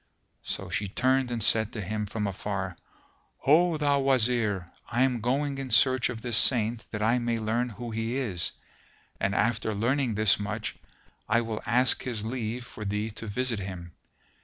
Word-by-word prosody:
So - - -5
she 100 - -1
turned 130 +5 +2
and 120 -3 -1
said 110 0 +3
to 110 - -4
him 105 +2 -3
from 105 +1 -2
afar, 95 -1 -3 0.7
"Ho, 165 +3 +4
thou 145 -1 +2
Wazir, 120 -7 +2 0.2
I 120 +3 +2
am 125 -3 +1
going 135 +4 0
in 135 -1 -4
search 130 +2 +4
of 115 -2 -6
this 120 -3 0
Saint 115 -2 +2
that 105 -1 -3
I 115 +3 +3
may 120 -1 0
learn 115 +3 0
who 120 +1 -7
he 115 +3 -2
is; 100 -10 -2 0.7
and, 95 0 0
after 110 0 +1
learning 120 +2 +1
this 110 -1 +4
much, 105 +2 -3 0.5
I 115 +2 +4
will 115 -2 -4
ask 125 +4 +3
his 115 -5 -2
leave 120 0 -3
for 110 - -9
thee 105 +2 -2
to 110 +1 -7
visit 120 +1 0
him. 90 -3 -6
115 Hz, 175 wpm, -28 LUFS, 105-125 Hz, 0.7 s, Ho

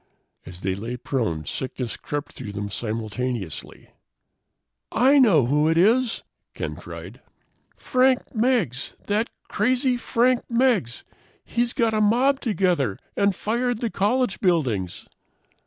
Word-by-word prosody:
As 90 0 -10
they 95 -1 0
lay 115 +6 -5
prone, 110 - -2
sickness 130 - -4
crept 145 0 -5
through 105 - -7
them 100 0 -4
simultaneously. 110 - -4 1.0
"I 270 +5 +5
know 185 - +5
who 150 +5 +2
it 165 - +2
is," 230 +7 +3 0.3
Ken - - -4
cried. - - -10 0.5
"Frank 255 0 +1
Meggs. 220 - 0
That 215 +3 0 0.2
crazy 250 +4 +1
Frank 245 +1 +2
Meggs! 235 - +1 0.4
He's 240 0 0
got 230 -2 +1
a 215 - +2
mob 250 +6 +3
together 180 - +1 0.2
and 200 -1 +2
fired 240 +3 -1
the 230 -2 -2
college 240 +3 +1
buildings!" 125 - 0
195 Hz, 125 wpm, -24 LUFS, -, 1.0 s, I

